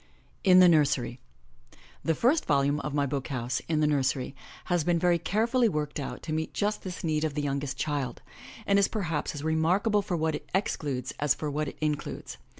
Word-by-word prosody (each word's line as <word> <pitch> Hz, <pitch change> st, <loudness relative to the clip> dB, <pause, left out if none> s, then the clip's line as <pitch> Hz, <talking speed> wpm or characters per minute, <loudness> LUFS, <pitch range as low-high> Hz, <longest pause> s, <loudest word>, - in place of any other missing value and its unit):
IN 185 Hz, -1 st, +6 dB
THE 185 Hz, -1 st, +9 dB
NURSERY 140 Hz, -6 st, +2 dB, 0.8 s
HE 165 Hz, -, +2 dB
first 265 Hz, -, +2 dB
volume 140 Hz, +1 st, +2 dB
of 150 Hz, -1 st, -4 dB
My 145 Hz, -1 st, +2 dB
BOOK 135 Hz, -1 st, -3 dB
HOUSE, 125 Hz, -2 st, -2 dB
In 155 Hz, -2 st, +1 dB
the -, -, +4 dB
Nursery, 135 Hz, -3 st, 0 dB, 0.3 s
has 175 Hz, -3 st, +1 dB
been 175 Hz, +1 st, +2 dB
very 175 Hz, 0 st, +3 dB
carefully 230 Hz, +7 st, +2 dB
worked 150 Hz, -4 st, -3 dB
out 130 Hz, -3 st, -5 dB
to 155 Hz, -, -3 dB
meet 160 Hz, 0 st, -3 dB
just 210 Hz, +1 st, 0 dB
this 185 Hz, -1 st, -7 dB
need 155 Hz, -2 st, 0 dB
of 155 Hz, -2 st, -1 dB
the 150 Hz, -, -1 dB
youngest 140 Hz, -1 st, -2 dB
child, 140 Hz, -4 st, -2 dB, 0.4 s
and 200 Hz, 0 st, +4 dB
is 200 Hz, -, +4 dB
perhaps 165 Hz, -9 st, -2 dB
as 145 Hz, -, -6 dB
remark 160 Hz, +5 st, +2 dB
able 210 Hz, -2 st, +3 dB
for 190 Hz, -3 st, -2 dB
what 160 Hz, 0 st, 0 dB
it -, -, -6 dB
excludes 140 Hz, -, -2 dB
as 145 Hz, -1 st, +2 dB
for 150 Hz, -1 st, -3 dB
what 150 Hz, +1 st, -1 dB
it -, -, -7 dB
includes. 150 Hz, -1 st, -3 dB
155 Hz, 205 wpm, -28 LUFS, 140-180 Hz, 0.8 s, THE